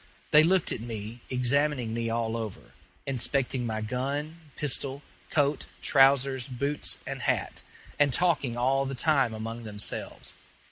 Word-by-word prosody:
They 150 - +8
looked 180 +2 +3
at - - -3
me, 115 0 -6
examining 125 -1 +1
me 115 0 -2
all 115 0 -1
over, 110 -4 -6 0.3
inspecting 130 -1 0
my 110 -1 -2
gun, 140 +8 -3 0.2
pistol, 140 0 -1 0.3
coat, 145 -1 +1 0.2
trousers, 135 -2 +4
boots, 140 +3 -1
and - - -5
hat, - - 0 0.4
and 145 -1 +4
talking 145 -6 +1
all 135 +2 +2
the 135 - -4
time 135 -3 +2
among 115 +2 -6
themselves. 105 -2 -2
130 Hz, 135 wpm, -28 LUFS, 115-140 Hz, 0.4 s, They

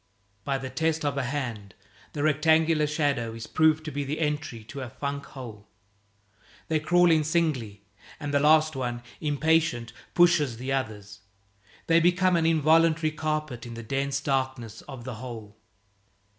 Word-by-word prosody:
By 135 +3 -1
the 130 -1 -6
test 160 +2 0
of 145 -2 0
a 140 -2 -1
hand, 120 -8 -4 0.4
the 145 - -2
rectangular 155 +1 +3
shadow 140 -7 -1
is 115 -1 -7
proved 155 0 +2
to 155 - -4
be 145 +1 -2
the 140 +3 -3
entry 150 -7 -2
to 135 +5 -8
a 130 - -5
funk 140 +2 -4
hole. 115 -6 -10 1.0
They 160 - +2
crawl 175 +3 +4
in 155 -1 +4
singly; 145 -11 -1 0.4
and 145 -2 -4
the 140 - +4
last 155 +1 +4
one, 120 -2 -3 0.2
impatient, 150 -5 +1 0.2
pushes 170 -8 +4
the 130 +3 -4
others; 105 -6 -4 0.7
they 165 0 +4
become 180 +2 +3
an 165 -1 +2
involuntary 160 0 +3
carpet 155 -6 -3
in 115 - -8
the 115 - -7
dense 140 +3 -1
darkness 130 -5 -2
of 130 -4 -8
the 130 0 -5
hole. 110 -5 -8
145 Hz, 155 wpm, -27 LUFS, 120-155 Hz, 1.0 s, crawl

